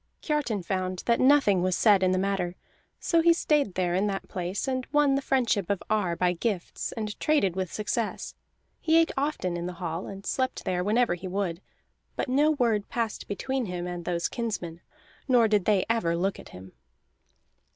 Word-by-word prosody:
Kiartan 275 - -1
found 185 0 -2
that 235 - +2
nothing 255 -9 +4
was 185 0 +1
said 205 -4 +4
in 185 - +3
the 185 - +1
matter; 185 -2 -1 0.4
so 335 -1 +2
he 335 +1 +6
stayed 295 - +1
there 180 -1 0
in 190 +3 +1
the 195 -1 -1
place, 180 +6 -3
and 260 -1 -2
won 295 -2 +4
the 275 - +1
friendship 240 -9 +1
of 200 -2 -1
Ar 195 -6 +1
by 180 +1 +1
gifts, 185 0 -3
and 215 -2 -5
traded 285 - +2
with 185 -2 -3
success. 215 +1 -3 0.5
He 320 0 +3
ate 330 - +2
often 270 - -1
at 170 - -4
the 180 - -5
hall, 170 0 -4
and 195 0 -9
slept 260 -1 -2
there 180 -1 0
whenever 225 +1 +2
he 180 +2 -6
would; 185 -2 -2 0.5
but - - -2
no 290 +4 +3
word 235 -8 +1
passed 230 -2 -3
between 260 +4 -2
him 180 -1 -4
and 175 -1 -5
those 170 -1 -1
kinsmen, 180 -8 -4 0.5
nor 245 -4 +5
did 210 -3 +2
they 205 -3 +3
ever 220 -8 +1
look 190 +3 -1
at - - -12
him. 95 +1 -12
200 Hz, 190 wpm, -27 LUFS, 180-250 Hz, 0.5 s, he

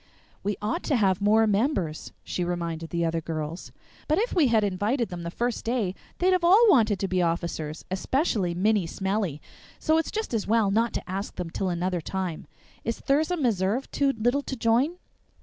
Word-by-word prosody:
"We 205 -1 -2
ought 220 +12 -1
to 285 - +1
have 195 -4 +2
more 215 +2 +4
members," 200 - 0
she 180 - -3
reminded 170 -2 -3
the 170 -1 0
other 165 0 -1
girls, 160 +1 -5 0.4
"but 310 - +2
if 460 +5 0
we 320 -7 +4
had 225 -3 +3
invited 205 +5 0
them 175 -2 -6
the 170 - -4
first 240 +6 -2
day 225 -6 0 0.2
they'd 370 +1 +3
have 365 -1 +1
all 390 +7 +7
wanted 220 - +4
to 195 - 0
be 185 -1 +1
officers, 165 -2 -2
especially 195 - 0
Minnie 200 0 +2
Smellie, 190 -4 -2 0.4
so 315 0 +2
it's 325 - -2
just 440 - -3
as 220 -3 -1
well 220 -2 +3
not 230 +3 +2
to - - -4
ask 195 +2 -4
them 175 -2 -5
till 190 +2 -2
another 175 0 -1
time. 185 -1 -4 0.4
Is 230 - -2
Thirza 310 +6 +1
Meserve 230 - 0
too 280 -1 +2
little 245 +6 +1
to 275 - -5
join?" 245 +9 +2
205 Hz, 190 wpm, -26 LUFS, 180-250 Hz, 0.4 s, all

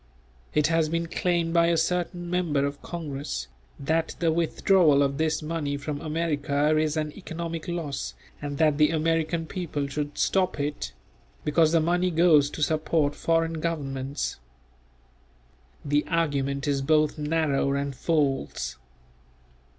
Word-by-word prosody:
It 150 - +4
has 165 -1 +2
been 165 +1 -1
claimed 170 0 0
by 170 -1 +4
a 170 -1 +2
certain 175 +1 -1
member 170 -6 +1
of 140 0 -4
congress, 140 - -5 0.3
that 160 +3 0
the 165 -1 +2
withdrawal 165 -2 +3
of 140 +1 -1
this 160 0 0
money 150 -3 -2
from 145 0 -5
America 155 -2 0
is 155 0 +1
an 155 -1 -1
economic 165 -3 -5
loss 160 -6 -4 0.3
and 145 -1 -4
that 155 -2 +3
the 150 - +5
American 165 +1 0
people 160 -5 -3
should 145 +1 -4
stop 185 -5 +1
it; 145 - -3 0.5
because 155 +1 +3
the 165 - +4
money 175 +3 +1
goes 160 -4 +5
to 150 - -3
support 155 -1 +1
foreign 165 -1 0
governments. 140 -4 -3 1.5
The 145 +1 +2
argument 140 -4 0
is 140 -1 +1
both 155 +2 +2
narrow 150 -3 +1
and 140 -1 -2
false. 135 - -1
155 Hz, 135 wpm, -26 LUFS, 145-165 Hz, 1.5 s, the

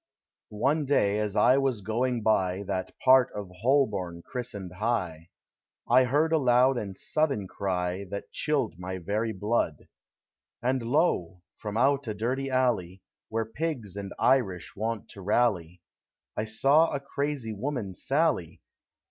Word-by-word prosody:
One 145 +7 +1
day, 105 -7 +2
as 105 -1 -2
I 130 +4 +5
was 130 -6 0
going 115 +3 -1
by 95 -3 +1
That 95 -1 -4
part 130 -1 +6
of 100 -3 -6
Ilolborn 95 -11 +1
christened 105 -7 -6
High, 90 -6 -2 0.6
I 130 - +5
heard 150 +6 +2
a 160 - +4
loud 130 0 +4
and 100 -2 -6
sudden 140 -11 0
cry 90 0 -2
That 100 +2 -7
chilled 135 - -1
my 95 +1 -4
very 105 +6 -1
blood; 105 +3 -1 0.7
And 130 +1 0
lo! 115 - 0
from 105 0 -5
out 135 +2 +2
a 110 - -3
dirty 130 +6 -2
alley, 115 -9 0 0.3
Where 115 0 -1
pigs 120 - -4
and 100 -1 -6
Irish 105 -10 +1
wont 110 +1 -3
to 100 - -10
rally, 90 -5 0 0.5
I 105 - -1
saw 140 +9 +4
a 140 - -1
crazy 140 -4 -3
woman 120 -3 -3
sally. 135 - 0
110 Hz, 140 wpm, -28 LUFS, 95-130 Hz, 0.7 s, part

